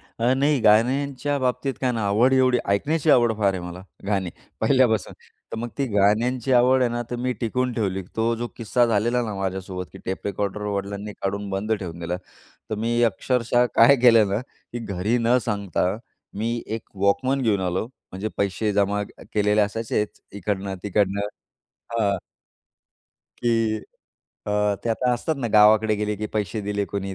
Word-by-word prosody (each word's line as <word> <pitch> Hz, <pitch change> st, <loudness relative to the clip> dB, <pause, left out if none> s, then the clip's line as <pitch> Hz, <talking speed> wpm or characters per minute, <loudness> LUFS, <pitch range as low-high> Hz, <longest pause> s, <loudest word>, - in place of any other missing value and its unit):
अ, 120 Hz, +2 st, -1 dB
नाही. 140 Hz, +1 st, +2 dB
गाण्यांच्या 135 Hz, +6 st, +2 dB
बाबतीत 125 Hz, +1 st, -1 dB
काय 130 Hz, -, +1 dB
आहे 125 Hz, -, 0 dB
ना 110 Hz, -, -1 dB
आवड 115 Hz, +6 st, +3 dB
एवढी 130 Hz, -1 st, +4 dB
ऐकण्याची 150 Hz, +10 st, +1 dB
आवड 120 Hz, -4 st, +5 dB
फार 100 Hz, -2 st, +3 dB
आहे 95 Hz, -, -4 dB
मला 90 Hz, +1 st, -7 dB, 0.2 s
गाणी 95 Hz, -3 st, 0 dB, 0.3 s
पहिल्यापासून. 130 Hz, -5 st, +2 dB, 0.4 s
तर -, -, -3 dB
मग 120 Hz, +1 st, -3 dB
ती 140 Hz, -, +1 dB
गाण्यांची 115 Hz, +4 st, +2 dB
आवड 125 Hz, +1 st, +5 dB
आहे 120 Hz, -, +2 dB
ना, 120 Hz, 0 st, -2 dB
तर 120 Hz, -, -2 dB
मी 125 Hz, +1 st, -1 dB
टिकवून 125 Hz, +2 st, 0 dB
ठेवली. 95 Hz, -5 st, -1 dB
तो 115 Hz, +1 st, +1 dB
जो 120 Hz, +1 st, -3 dB
किस्सा 120 Hz, +2 st, +2 dB
झालेला 115 Hz, +2 st, +1 dB
ना 110 Hz, -3 st, -4 dB
माझ्यासोबत 95 Hz, -1 st, -4 dB
की -, -, -10 dB
टेप 95 Hz, +2 st, -4 dB
रेकॉर्डर 100 Hz, +1 st, -2 dB
वडिलांनी 100 Hz, 0 st, -3 dB
काढून 100 Hz, +1 st, -2 dB
बंद 100 Hz, +3 st, -1 dB
ठेवून 90 Hz, -6 st, -4 dB
दिला. 85 Hz, +1 st, -2 dB, 0.5 s
तर -, -, 0 dB
मी 115 Hz, +2 st, 0 dB
अक्षरशः 120 Hz, +2 st, +2 dB
काय 120 Hz, +5 st, +7 dB
केलं 115 Hz, -4 st, +6 dB
ना 105 Hz, -, 0 dB
की 120 Hz, -1 st, -11 dB
घरी 100 Hz, +4 st, -1 dB
न 115 Hz, +2 st, +3 dB
सांगता 100 Hz, -3 st, -1 dB, 0.4 s
मी 115 Hz, +2 st, -1 dB
एक 110 Hz, 0 st, -4 dB
वॉकमन 130 Hz, +8 st, +1 dB
घेऊन 105 Hz, -5 st, +2 dB
आलो. 90 Hz, +3 st, -1 dB, 0.3 s
म्हणजे 95 Hz, +4 st, -3 dB
पैसे 100 Hz, +2 st, 0 dB
जमा 100 Hz, 0 st, +1 dB
केलेले 105 Hz, +1 st, -1 dB
असायचेच, 105 Hz, 0 st, -1 dB
इकडनं 100 Hz, -1 st, -3 dB
तिकडनं. 100 Hz, 0 st, +1 dB, 0.7 s
हां. 105 Hz, -4 st, +1 dB, 1.2 s
की 115 Hz, -2 st, +1 dB, 0.7 s
अ, 105 Hz, 0 st, +1 dB
ते -, -, -1 dB
आता 125 Hz, +2 st, +1 dB
असतात 155 Hz, +6 st, -2 dB
ना 120 Hz, -3 st, -2 dB
गावाकडे 110 Hz, +1 st, +6 dB
गेले 105 Hz, 0 st, -2 dB
की 105 Hz, +1 st, -3 dB
पैसे 105 Hz, +1 st, -1 dB
दिले 100 Hz, 0 st, -2 dB
कोणी 100 Hz, -1 st, -4 dB
110 Hz, 170 wpm, -24 LUFS, 100-120 Hz, 1.2 s, काय